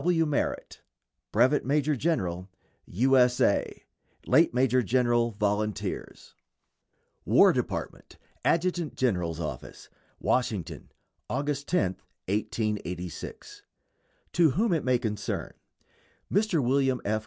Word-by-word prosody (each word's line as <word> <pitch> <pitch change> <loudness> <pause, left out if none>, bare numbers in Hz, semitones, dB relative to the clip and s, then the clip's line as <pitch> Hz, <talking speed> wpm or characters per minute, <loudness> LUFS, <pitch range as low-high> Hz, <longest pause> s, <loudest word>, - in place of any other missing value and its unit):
W. 165 -2 +2
MERRITT, 150 -2 -2 0.5
Brevet 130 +7 +3
Major 145 +2 +1
General 95 - -2 0.4
U. 130 +8 +2
S. 125 -1 +4
A. - - +1 0.4
Late - - +4
Major 125 0 +2
General 120 0 +2
Volunteers. 105 0 -3 0.9
WAR - - +5
DEPARTMENT, - - -4 0.3
ADJUTANT 170 -2 0
GENERAL'S 90 -10 -1
OFFICE, 75 -6 -7 0.3
WASHINGTON, 110 -9 -2 0.4
August 140 +1 -2
10, 160 - 0 0.3
1886. 100 -4 -4 0.7
To 170 -2 +5
whom 200 - +1
it 160 - 0
may 125 -1 +2
concern: 110 -3 -4 0.8
Mr. 195 -7 +2
William 130 0 +2
F. 110 +1 +1
125 Hz, 100 wpm, -27 LUFS, 105-145 Hz, 0.9 s, WAR